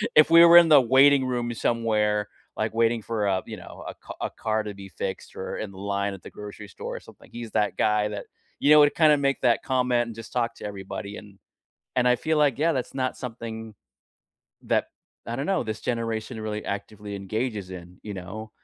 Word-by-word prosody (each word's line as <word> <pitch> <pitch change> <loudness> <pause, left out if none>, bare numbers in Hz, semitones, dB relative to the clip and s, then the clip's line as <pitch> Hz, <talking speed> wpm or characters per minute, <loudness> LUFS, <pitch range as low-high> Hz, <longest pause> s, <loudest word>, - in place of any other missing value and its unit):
if 155 - +7
we 170 +1 +9
were 170 0 +8
in 170 -1 +8
the 150 -2 +9
waiting 135 +2 +5
room 120 -2 -2
somewhere, 105 -3 0 0.3
like 110 +1 -1
waiting 115 0 +2
for 110 -1 -2
a, 95 -1 +1
you 110 - -7
know, 90 - -11
a - - -5
car - - -10
a - - -1
car 110 0 -1
to 105 -1 -6
be 100 0 -10
fixed 95 +1 -6
or - - -5
in 105 - -5
the 95 - -14
line 100 0 -2
at 95 - -11
the - - -9
grocery 105 0 -9
store - - -7
or - - -7
something, - - -17
he's 120 -2 -7
that 105 - 0
guy 105 0 +2
that, 105 -1 -6 0.3
you 145 - +2
know, 150 - +9
would 145 0 +5
kind 155 -2 +5
of 145 - +2
make 140 -1 0
that 120 -2 +2
comment 125 -3 +1
and 115 - -8
just 115 0 -10
talk 120 -2 0
to - - -9
everybody 100 0 -6
and 100 -2 -13 0.6
and 125 -1 +3
I 125 - +5
feel 155 +2 0
like, 145 -4 +3
yeah, 160 +3 +3
that's 130 -4 -3
not 130 -1 -1
something 115 -3 -7 0.9
that - - +1 0.4
I 115 +1 -3
don't 140 +3 -3
know, 190 -3 +1
this 110 -2 -5
generation 115 -1 -3
really 105 -1 -4
actively 100 +1 -5
engages 105 0 -3
in, 90 -1 -10
you 105 -1 -6
know? 95 +4 -7
110 Hz, 220 wpm, -25 LUFS, 105-125 Hz, 0.9 s, we